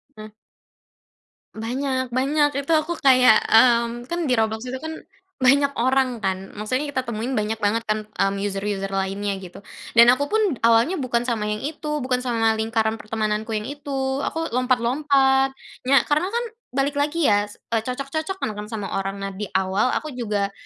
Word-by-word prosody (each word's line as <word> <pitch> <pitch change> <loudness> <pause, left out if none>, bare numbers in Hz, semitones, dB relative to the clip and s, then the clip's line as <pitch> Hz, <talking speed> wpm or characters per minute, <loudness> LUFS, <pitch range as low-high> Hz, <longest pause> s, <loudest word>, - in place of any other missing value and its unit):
Eh. 215 0 -10 1.3
Banyak 260 +3 -2
banyak. 285 +4 +2
itu 280 +3 -3
aku 315 +2 -1
kayak, 255 -4 +6
mmm, 235 +1 +4
kan 345 - -2
di 255 - +2
Roblox 220 +1 -1
itu 260 +1 -4
kan 320 0 -4 0.4
banyak 275 +2 +4
orang 255 0 +1
kan, 190 -2 -3
maksudnya 255 +8 -2
kita 260 -2 -2
temuin 235 +2 -3
banyak 215 +1 -2
banget 220 +3 0
kan, 215 0 -2
mmm, 195 -1 -1
user-user 195 0 -2
lainnya 195 +1 -2
gitu, 185 0 -11 0.3
dan 235 +1 +8
aku 255 +3 +3
pun 435 +8 +1 0.2
awalnya 230 +11 +4
bukan 245 -4 0
sama 220 -3 -1
yang 210 0 -2
itu, 300 0 -3
bukan 250 0 -1
sama 225 -2 +1
lingkaran 220 0 0
pertemananku 215 0 -2
yang 215 +3 -3
itu, 270 -2 -3
aku 325 0 -3
lompat-lompat, 265 +2 +2 0.3
nya 270 0 +5
karena 300 +4 +2
kan 475 +1 0 0.3
balik 280 +2 0
lagi 300 +3 0
ya, 205 0 +3
s 205 - -12 0.2
eee, 230 - +2
cocok-cocokan 275 - -3
kan 210 - -5
sama 210 -3 -5
orang. 195 0 -3
Nah 195 - -3
di 200 +2 -5
awal, 190 +4 +2
aku 310 - -5
juga 205 -3 -1
240 Hz, 170 wpm, -23 LUFS, 215-275 Hz, 1.3 s, dan